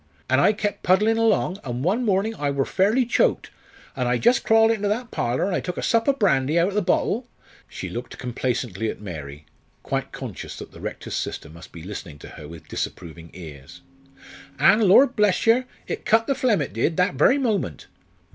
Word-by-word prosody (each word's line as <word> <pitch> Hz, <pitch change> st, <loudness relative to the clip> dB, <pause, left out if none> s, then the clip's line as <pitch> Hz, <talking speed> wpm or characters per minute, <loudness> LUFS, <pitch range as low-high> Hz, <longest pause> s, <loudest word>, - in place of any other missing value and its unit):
An' 130 Hz, +1 st, +3 dB
I 140 Hz, -, +5 dB
kep' 205 Hz, -1 st, -3 dB
puddlin' 210 Hz, +5 st, +3 dB
along, 210 Hz, -4 st, +1 dB
an' 125 Hz, -1 st, -4 dB
one 205 Hz, +9 st, +1 dB
mornin' 205 Hz, 0 st, +1 dB
I 145 Hz, -9 st, -2 dB
wor 140 Hz, -1 st, 0 dB
fairly 215 Hz, +7 st, +2 dB
choked, 240 Hz, -, +1 dB, 0.4 s
an' 125 Hz, -3 st, -1 dB
I 125 Hz, 0 st, +2 dB
just 240 Hz, -, +3 dB
crawled 225 Hz, 0 st, +5 dB
into 210 Hz, -2 st, -1 dB
that 230 Hz, +3 st, -2 dB
parlour, 120 Hz, +7 st, -1 dB
an' 195 Hz, -, -2 dB
I -, -, +1 dB
took 180 Hz, -, -5 dB
a -, -, -3 dB
sup 230 Hz, -1 st, +1 dB
o' -, -, +5 dB
brandy 160 Hz, -, +1 dB
out 170 Hz, +3 st, +3 dB
o' -, -, -8 dB
the 210 Hz, -, +1 dB
bottle" 230 Hz, +6 st, 0 dB, 0.4 s
she -, -, -6 dB
looked 120 Hz, +1 st, -7 dB
complacently 120 Hz, -4 st, -3 dB
at -, -, -6 dB
Mary, 75 Hz, -7 st, -8 dB, 0.4 s
quite -, -, -3 dB
conscious -, -, -7 dB
that -, -, -9 dB
the -, -, -13 dB
Rector's -, -, -6 dB
sister 80 Hz, -, -4 dB
must 85 Hz, +1 st, -13 dB
be 85 Hz, -, -10 dB
listening 90 Hz, -5 st, -8 dB
to -, -, -12 dB
her 75 Hz, -, -11 dB
with 80 Hz, -1 st, -12 dB
disapproving 85 Hz, -1 st, -6 dB
ears 80 Hz, -1 st, -11 dB, 0.8 s
"an', 220 Hz, -, +5 dB
lor' 200 Hz, +9 st, +8 dB
bless 210 Hz, -7 st, +1 dB
yer, 235 Hz, +3 st, +4 dB, 0.2 s
it -, -, -5 dB
cut 225 Hz, 0 st, +3 dB
the 275 Hz, -, +1 dB
phlegm, 240 Hz, -, +1 dB
it 130 Hz, -, -8 dB
did, 135 Hz, +9 st, 0 dB
that 180 Hz, +1 st, +2 dB
very 150 Hz, -, +4 dB
moment. 205 Hz, -, -2 dB
180 Hz, 205 wpm, -23 LUFS, -, 0.8 s, lor